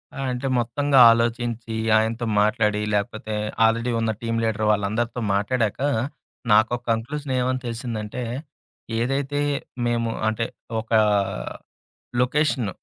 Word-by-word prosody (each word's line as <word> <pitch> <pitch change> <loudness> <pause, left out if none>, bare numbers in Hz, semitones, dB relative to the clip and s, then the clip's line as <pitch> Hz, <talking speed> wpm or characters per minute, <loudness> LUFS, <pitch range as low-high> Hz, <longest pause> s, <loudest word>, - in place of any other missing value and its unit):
ఆ! - - -7
అంటే 125 +2 -3
మొత్తంగా 135 +4 +2
అలోచించి, 115 0 -1 0.2
ఆయనతో 115 +2 0 0.2
మాట్లాడి, 105 0 +2
లేపోతే 105 +1 -2 0.3
ఆల్రెడీ 115 +2 +1
ఉన్న 115 -1 +1
టీమ్ 115 -1 -1
లీడర్ 110 -1 0
వాళ్ళందరితో 110 +4 -1
మాట్లాడాక, 110 +2 0 0.7
నాకోక 110 +3 +4
కంక్లూజన్ 135 +5 -2
ఏమని 130 +1 0
తెలిసిందంటే, 115 -1 -4 0.8
ఏదైతే 135 +4 -1 0.5
మేము, 115 -1 0 0.2
అంటే 110 +1 0 0.4
ఒక 110 - -18 1.3
లొకేషన్ 135 -3 +1
115 Hz, 105 wpm, -23 LUFS, 110-125 Hz, 1.3 s, నాకోక